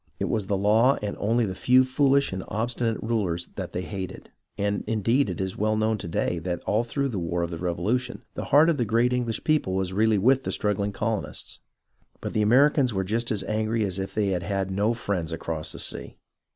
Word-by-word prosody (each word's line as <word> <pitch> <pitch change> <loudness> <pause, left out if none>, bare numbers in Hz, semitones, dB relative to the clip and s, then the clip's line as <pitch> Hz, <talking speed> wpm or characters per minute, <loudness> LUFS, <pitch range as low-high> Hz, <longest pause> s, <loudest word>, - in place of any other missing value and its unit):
It - - -1
was 105 -4 -1
the 100 - +1
law 110 +7 +4
and 105 - -2
only 115 +3 +2
the 95 - -3
few 130 +6 +4
foolish 140 -1 +2
and 95 -1 -4
obstinate 115 +1 -1
rulers 100 -7 -1
that - - -5
they 90 - -3
hated, 95 -1 -7 0.3
and 100 0 -1
indeed 115 +5 +2
it - - -4
is 95 -1 -3
well 110 +1 +1
known 110 0 +1
to - - -6
day 85 +1 -1
that 85 +1 -3
all 110 +3 +1
through 140 +3 -2
the 105 -6 -3
war 85 0 -1
of 85 - -3
the 85 - -5
Revolution 100 +9 -1
the - - -5
heart 150 +3 +5
of 155 - -1
the 125 - +1
great 115 +3 +2
English 120 -3 -1
people 150 -12 +1
was 95 -1 -1
really 110 +2 +3
with 130 +7 +3
the - - -3
struggHng 105 -1 0
colonists. 110 +1 -3 0.6
But - - -5
the 110 - +1
Americans 130 +2 +4
were 95 - +1
just 115 +5 -1
as 105 -3 0
angry 110 +1 0
as 95 -1 -3
if 95 - -5
they 105 -2 +1
had 90 -2 0
had 95 +1 -2
no 105 +4 +1
friends 95 -8 -2
across 80 -1 -3
the - - -6
sea. - - -2
105 Hz, 220 wpm, -26 LUFS, 95-120 Hz, 0.6 s, heart